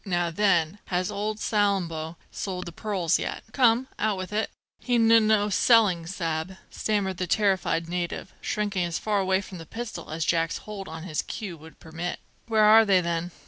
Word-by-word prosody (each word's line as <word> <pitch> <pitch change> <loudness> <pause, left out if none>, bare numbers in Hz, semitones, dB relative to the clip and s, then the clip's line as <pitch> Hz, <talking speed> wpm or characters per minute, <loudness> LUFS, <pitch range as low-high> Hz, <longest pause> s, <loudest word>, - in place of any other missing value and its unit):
Now, 175 -3 0
then, 185 -1 +2
has 180 +2 -1
old 210 +1 -2
Salambo 180 -7 0 0.2
sold 185 -2 -4
the 170 - -7
pearls 185 -3 0
yet? - - -4
Come, 245 0 +3
out 210 -2 +1
with 185 +2 -6
it!" 215 +1 0 0.3
"He 245 - 0
n 225 -1 +4
n 225 -1 +6
no 210 -1 +3
selling, 195 -6 +4
sa'b," 170 0 -3
stammered 200 -4 -1
the 185 - -2
terrified 190 -4 +1
native, 175 0 -4
shrinking 205 -3 -1
as 170 -1 -2
far 210 -2 0
away 190 0 +2
from 190 -3 -10
the 165 - -9
pistol 235 0 -6
as 160 0 -2
Jack's 165 -1 +1
hold 205 -2 -7
on 160 0 -7
his 155 -4 -2
queue 205 -6 -6
would 160 0 -15
permit 165 +2 -5 0.3
"Where 220 -2 +3
are 220 +1 +8
they, 195 -3 +4
then? 170 0 -2
190 Hz, 185 wpm, -26 LUFS, 170-210 Hz, 0.3 s, are